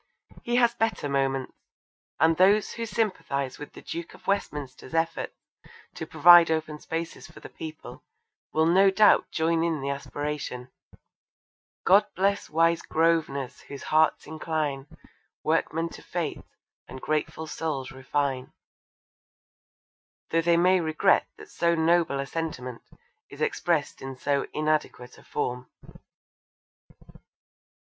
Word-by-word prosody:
He 240 Hz, -, -2 dB
has 240 Hz, -1 st, +4 dB
better 225 Hz, -9 st, -1 dB
moments, 135 Hz, -1 st, -1 dB, 0.7 s
and 160 Hz, +1 st, +4 dB
those 200 Hz, +4 st, +4 dB
who 230 Hz, 0 st, -5 dB
sympathise 165 Hz, -, -2 dB
with 145 Hz, -, -9 dB
the -, -, -12 dB
Duke 170 Hz, 0 st, -6 dB
of -, -, -19 dB
Westminster's 150 Hz, -7 st, -3 dB
efforts 165 Hz, 0 st, -1 dB, 0.6 s
to -, -, -6 dB
provide 175 Hz, -1 st, +8 dB
open 155 Hz, -1 st, -2 dB
spaces 165 Hz, +2 st, -5 dB
for -, -, -14 dB
the -, -, -11 dB
people, 160 Hz, -1 st, -9 dB, 0.5 s
will 160 Hz, 0 st, +2 dB
no 190 Hz, +4 st, +5 dB
doubt 205 Hz, +2 st, +4 dB
join 165 Hz, +1 st, +1 dB
in 165 Hz, -2 st, 0 dB
the 140 Hz, +1 st, -2 dB
aspiration 140 Hz, -3 st, -5 dB, 1.1 s
God 195 Hz, +3 st, +6 dB
bless 200 Hz, +2 st, 0 dB
wise 165 Hz, +1 st, +2 dB
Grosvenors 155 Hz, -5 st, 0 dB
whose 140 Hz, -1 st, -8 dB
hearts 155 Hz, 0 st, +2 dB
incline, 155 Hz, -3 st, -3 dB, 0.6 s
Workmen 165 Hz, +1 st, 0 dB
to -, -, -12 dB
fete, -, -, -4 dB, 0.5 s
and 130 Hz, +1 st, -9 dB
grateful 155 Hz, +2 st, -2 dB
souls 150 Hz, -4 st, -4 dB
refine; 135 Hz, 0 st, -2 dB, 1.8 s
though 165 Hz, -, +3 dB
they 170 Hz, 0 st, +3 dB
may 180 Hz, +2 st, +4 dB
regret 155 Hz, -1 st, +2 dB
that 425 Hz, -1 st, -13 dB
so 170 Hz, 0 st, +1 dB
noble 165 Hz, -3 st, +2 dB
a 140 Hz, -, -2 dB
sentiment 130 Hz, -5 st, -5 dB, 0.5 s
is -, -, -12 dB
expressed 175 Hz, -, -1 dB
in 135 Hz, -1 st, -7 dB
so 140 Hz, +1 st, 0 dB
inadequate 155 Hz, -5 st, -2 dB
a -, -, -18 dB
form. 125 Hz, -3 st, -4 dB
160 Hz, 125 wpm, -26 LUFS, 140-170 Hz, 1.8 s, provide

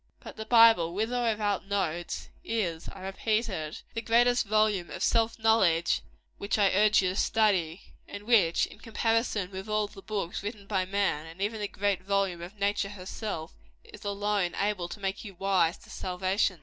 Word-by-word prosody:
But -, -, -10 dB
the 220 Hz, -, -6 dB
Bible, 225 Hz, -8 st, +6 dB
with 220 Hz, +4 st, -1 dB
or 245 Hz, -1 st, +1 dB
without 205 Hz, -3 st, -1 dB
notes, 175 Hz, -4 st, -2 dB
is 180 Hz, -8 st, -2 dB
I -, -, -10 dB
repeat 215 Hz, +4 st, -1 dB
it 155 Hz, -5 st, -5 dB
the 230 Hz, -, -3 dB
great 235 Hz, +1 st, +4 dB
volume 215 Hz, -4 st, +1 dB
of -, -, -5 dB
self 230 Hz, 0 st, +2 dB
knowledge 220 Hz, -7 st, +3 dB, 0.4 s
which 200 Hz, -, -1 dB
I 200 Hz, -2 st, +4 dB
urge 210 Hz, +1 st, +4 dB
you 185 Hz, -, +2 dB
to 185 Hz, -, -3 dB
study, 195 Hz, -6 st, +1 dB, 0.3 s
and 205 Hz, -, -8 dB
which, 205 Hz, -8 st, +4 dB
in -, -, -14 dB
comparison 225 Hz, -4 st, 0 dB
with 190 Hz, +2 st, -7 dB
all 215 Hz, 0 st, +1 dB
the 200 Hz, -1 st, -12 dB
books 200 Hz, -4 st, -3 dB
written 205 Hz, 0 st, -6 dB
by 195 Hz, -2 st, 0 dB
man, 190 Hz, -5 st, -1 dB
and 165 Hz, +3 st, -12 dB
even 210 Hz, +3 st, -2 dB
the 205 Hz, -, -1 dB
great 200 Hz, -1 st, -1 dB
volume 195 Hz, -2 st, 0 dB
of 180 Hz, +5 st, -9 dB
nature 200 Hz, 0 st, 0 dB
herself, 190 Hz, -3 st, -6 dB, 0.3 s
is -, -, -14 dB
alone 205 Hz, -2 st, -1 dB
able 200 Hz, -4 st, -1 dB
to 210 Hz, -, -8 dB
make 195 Hz, 0 st, -3 dB
you 200 Hz, -4 st, -9 dB
wise 185 Hz, -3 st, +2 dB
to -, -, -16 dB
salvation. 185 Hz, 0 st, -1 dB
200 Hz, 185 wpm, -29 LUFS, 185-215 Hz, 0.4 s, Bible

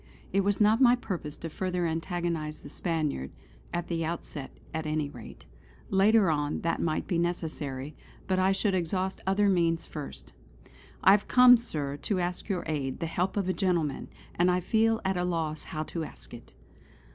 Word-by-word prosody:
It 195 Hz, -, +4 dB
was 200 Hz, 0 st, +2 dB
not 215 Hz, +3 st, +4 dB
my 245 Hz, -1 st, +7 dB
purpose 175 Hz, -11 st, -5 dB
to 165 Hz, -, -6 dB
further 180 Hz, +2 st, -2 dB
antagonise 165 Hz, -2 st, -2 dB
the -, -, -10 dB
Spaniard; 155 Hz, -, -2 dB, 0.4 s
at 175 Hz, 0 st, -3 dB
the 165 Hz, -1 st, -1 dB
outset 160 Hz, -4 st, -5 dB, 0.2 s
at 160 Hz, -1 st, -3 dB
any 150 Hz, -2 st, -1 dB
rate. -, -, -11 dB, 0.5 s
Later 200 Hz, -1 st, +5 dB
on, 145 Hz, -1 st, -1 dB
that 165 Hz, 0 st, -1 dB
might 155 Hz, -2 st, 0 dB
be 175 Hz, -, 0 dB
necessary; 155 Hz, -5 st, -3 dB, 0.3 s
but 185 Hz, -1 st, +1 dB
I 190 Hz, +1 st, +4 dB
should 195 Hz, +1 st, +1 dB
exhaust 185 Hz, +2 st, -1 dB
other 200 Hz, +2 st, +3 dB
means 170 Hz, -3 st, +2 dB
first. 150 Hz, -3 st, -8 dB, 0.7 s
"I -, -, +8 dB
have 205 Hz, +1 st, +3 dB
come, 250 Hz, 0 st, +8 dB
Sir, 150 Hz, -, -3 dB
to 190 Hz, +6 st, 0 dB
ask 180 Hz, +4 st, -3 dB
your 185 Hz, -3 st, -1 dB
aid, 140 Hz, -4 st, -2 dB
the 170 Hz, -, -2 dB
help 180 Hz, +4 st, -1 dB
of 195 Hz, -2 st, 0 dB
a 185 Hz, -, +1 dB
gentleman; 170 Hz, -8 st, 0 dB, 0.3 s
and 175 Hz, +1 st, +3 dB
I 180 Hz, 0 st, +3 dB
feel 225 Hz, +4 st, +2 dB
at 190 Hz, -1 st, +1 dB
a 180 Hz, -, 0 dB
loss 165 Hz, -3 st, -2 dB
how 155 Hz, 0 st, -4 dB
to 165 Hz, +1 st, -4 dB
ask -, -, -10 dB
it." -, -, -12 dB
175 Hz, 180 wpm, -29 LUFS, 155-190 Hz, 0.7 s, I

